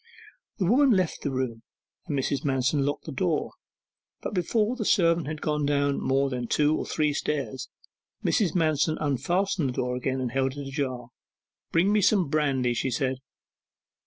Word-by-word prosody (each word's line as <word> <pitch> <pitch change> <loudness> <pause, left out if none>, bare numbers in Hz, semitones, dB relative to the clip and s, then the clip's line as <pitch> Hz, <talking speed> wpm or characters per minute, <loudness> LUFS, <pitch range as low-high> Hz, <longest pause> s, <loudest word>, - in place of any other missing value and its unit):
The 195 - 0
woman 265 +9 +4
left 185 -7 +1
the - - -1
room, 130 -4 -3 0.5
and 145 - -1
Mrs. 135 +1 -1
Manston 135 +1 +1
locked 145 +1 -2
the - - -6
door. - - -1 0.8
Before 210 +6 +1
the 240 - -3
servant 170 -5 +3
had 155 0 -5
gone 150 -1 0
down 140 -1 +1
more 135 +1 +2
than 125 -1 -3
two 150 +4 +2
or - - -3
three 150 -2 +1
stairs, 140 -3 -3 0.6
Mrs. 190 -7 +2
Manston 155 -2 +2
unfastened 155 - 0
the - - -3
door 125 0 -1
again, 130 +1 -2
and 125 -2 -2
held 135 0 0
it 140 -1 -5
ajar. 130 -4 -3 0.6
'Bring 185 +5 +3
me 210 - +3
some 190 -5 +3
brandy,' 135 -5 +1
she 130 - -1
said. 130 +1 -1
145 Hz, 165 wpm, -26 LUFS, 130-165 Hz, 0.8 s, woman